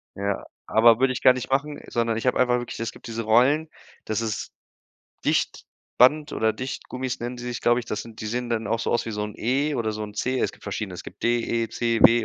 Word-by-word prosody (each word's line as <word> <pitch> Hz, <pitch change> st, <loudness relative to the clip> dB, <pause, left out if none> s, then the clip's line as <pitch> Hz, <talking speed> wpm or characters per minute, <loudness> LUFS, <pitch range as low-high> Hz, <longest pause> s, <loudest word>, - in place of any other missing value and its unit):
Ja, 100 Hz, 0 st, -2 dB, 0.2 s
aber 115 Hz, +1 st, +6 dB
würde 130 Hz, -1 st, +3 dB
ich 125 Hz, -, -6 dB
gar 130 Hz, -, +8 dB
nicht 125 Hz, 0 st, -5 dB
machen, 145 Hz, +2 st, -1 dB
sondern 115 Hz, -1 st, 0 dB
ich 115 Hz, -, -2 dB
hab 125 Hz, -, +3 dB
einfach 125 Hz, -1 st, +3 dB
wirklich 120 Hz, -2 st, -6 dB
es 115 Hz, -1 st, -2 dB
gibt -, -, -13 dB
diese 115 Hz, 0 st, -3 dB
Rollen, 130 Hz, +8 st, +4 dB, 0.4 s
das 110 Hz, +1 st, -1 dB
ist 110 Hz, -2 st, -3 dB, 0.7 s
Dichtband 150 Hz, +5 st, +1 dB
oder 110 Hz, 0 st, +1 dB
Dichtgummis 130 Hz, 0 st, -5 dB
nennen 120 Hz, +1 st, -4 dB
die 120 Hz, -, -8 dB
sich, 120 Hz, -2 st, -4 dB
glaube 120 Hz, +1 st, +3 dB
ich, 120 Hz, -, -10 dB
das 105 Hz, -, -3 dB
sind 115 Hz, -1 st, -12 dB
die 110 Hz, -, -4 dB
sehen 120 Hz, +2 st, -3 dB
dann 115 Hz, -1 st, -1 dB
auch 115 Hz, -, 0 dB
so -, -, -1 dB
aus 120 Hz, -, +1 dB
wie 115 Hz, -, -3 dB
so 105 Hz, -, -2 dB
'n 105 Hz, -, -7 dB
E 140 Hz, +6 st, 0 dB
oder 110 Hz, -2 st, -1 dB
so 105 Hz, -, -4 dB
'n 105 Hz, -1 st, -7 dB
C. 130 Hz, +4 st, -1 dB
Es -, -, +1 dB
gibt -, -, -17 dB
verschiedene, 100 Hz, -4 st, -4 dB
es 90 Hz, -, -8 dB
gibt -, -, -11 dB
D, 120 Hz, 0 st, +3 dB, 0.3 s
E, 115 Hz, -, -7 dB
C, 115 Hz, 0 st, 0 dB
W 115 Hz, 0 st, +7 dB
120 Hz, 250 wpm, -25 LUFS, 110-125 Hz, 0.7 s, gar